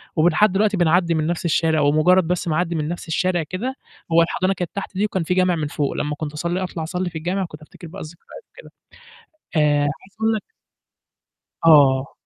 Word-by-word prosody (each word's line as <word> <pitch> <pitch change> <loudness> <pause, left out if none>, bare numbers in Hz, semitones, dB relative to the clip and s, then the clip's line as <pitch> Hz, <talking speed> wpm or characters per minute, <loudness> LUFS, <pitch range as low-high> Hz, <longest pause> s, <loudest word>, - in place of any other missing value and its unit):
ولحد 175 +5 +3
دلوقتي 205 +1 +1
بنعدّي 170 0 +2
من 155 0 0
نَفْس 175 0 -3
الشارع 160 -2 +2
ومُجرّد 160 +5 +3
بس 180 0 -1
ما 155 - 0
أعدّي 170 0 -1
من 150 -1 -2
نَفْس 175 0 -6
الشارع 175 +1 0
كده 210 - -4 0.4
هو 170 - +6
الحضانة 185 +3 0
كانت 180 -3 -5
تحت 200 0 -5
دي 205 - +2
وكان 190 -4 -2
في 180 - -1
جامع 185 -1 +2
من 150 -2 -2
فوق 145 -1 -2
لمّا 150 0 -3
كنت 150 -1 -6
أصلّي 170 +4 -2
أطلع 170 -3 -5
أصلّي 180 +2 -3
في 165 - -7
الجامع 180 +4 -2
كنت 150 -2 -12
أفتكر 160 +2 -13
بقى - - -9
الذكريات 170 - -12
كده. - - -14 0.9
آآ 150 -1 +3
عايز 145 - +1 0.3
أقول 225 0 +2
لك 215 - -4 1.2
آه. 140 -4 +5
170 Hz, 200 wpm, -21 LUFS, 155-185 Hz, 1.2 s, هو